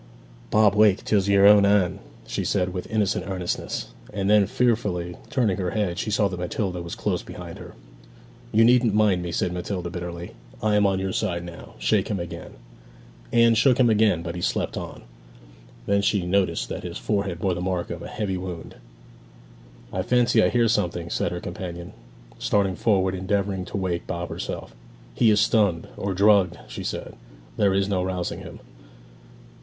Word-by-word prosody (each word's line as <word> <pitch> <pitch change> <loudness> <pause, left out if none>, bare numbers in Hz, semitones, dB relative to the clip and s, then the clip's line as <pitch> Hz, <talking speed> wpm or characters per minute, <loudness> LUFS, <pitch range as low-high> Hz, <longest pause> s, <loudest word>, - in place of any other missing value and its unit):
'Bob, 105 -2 +4
wake; 105 -2 +4
'tis 100 -2 +2
your 100 0 +5
own 105 0 +8
Anne!' 100 -3 +2 0.3
she - - -3
said, 90 -2 0
with 90 - -5
innocent 105 -4 0
earnestness; 90 -3 -3 0.2
and 100 -1 0
then, 105 -2 +5
fearfully 105 -8 0
turning 110 -8 +1
her 90 -2 -1
head, 95 -4 -1
she - - -2
saw 105 -1 +2
that 90 -2 -6
Matilda 90 0 -2
was 85 0 -6
close - - -1
behind - - -9
her. - - -11 0.8
'You 110 +1 +5
needn't 120 -3 +4
mind 105 -4 +3
me,' 85 -1 -4
said 90 +1 -1
Matilda 90 -1 -4
bitterly. 85 -1 -6 0.3
'I 105 -1 +2
am 105 -1 +4
on 95 -1 +1
your 95 0 -2
side 90 -5 -1
now. 85 -1 -10
Shake - - +1
him 100 - -2
again.' 85 0 -7 0.8
Anne 115 0 +5
shook 125 +3 +3
him 120 -3 +5
again, 105 -6 +3
but 85 -1 -4
he 90 - -5
slept - - -1
on. - - -7 0.8
Then 100 0 +2
she 100 -2 +1
noticed 90 -2 +1
that - - -4
his - - -6
forehead 95 - -1
bore 95 +1 0
the 90 - -4
mark 90 -1 -2
of - - -5
a - - -7
heavy 100 -4 -3
wound. 90 -3 -7 1.2
'I 95 - 0
fancy 120 +3 +3
I - - +4
hear 120 -1 +3
something!' 85 -5 -1
said - - -1
her - - -4
companion, 85 -1 -7 0.5
starting 100 -2 +1
forward 95 -4 +2
and 95 - -4
endeavouring 95 -1 -1
to - - -5
wake 90 -3 -2
Bob 85 0 -4
herself. - - -6 0.4
'He 115 - +3
is 105 -1 +4
stunned, 105 -6 +2
or 100 -1 -3
drugged!' 100 -3 +4
she - - -7
said; - - -5 0.4
'there 100 -2 +3
is 100 0 +1
no 95 -2 0
rousing 90 -1 -3
him.' - - -10
95 Hz, 180 wpm, -24 LUFS, 90-105 Hz, 1.2 s, own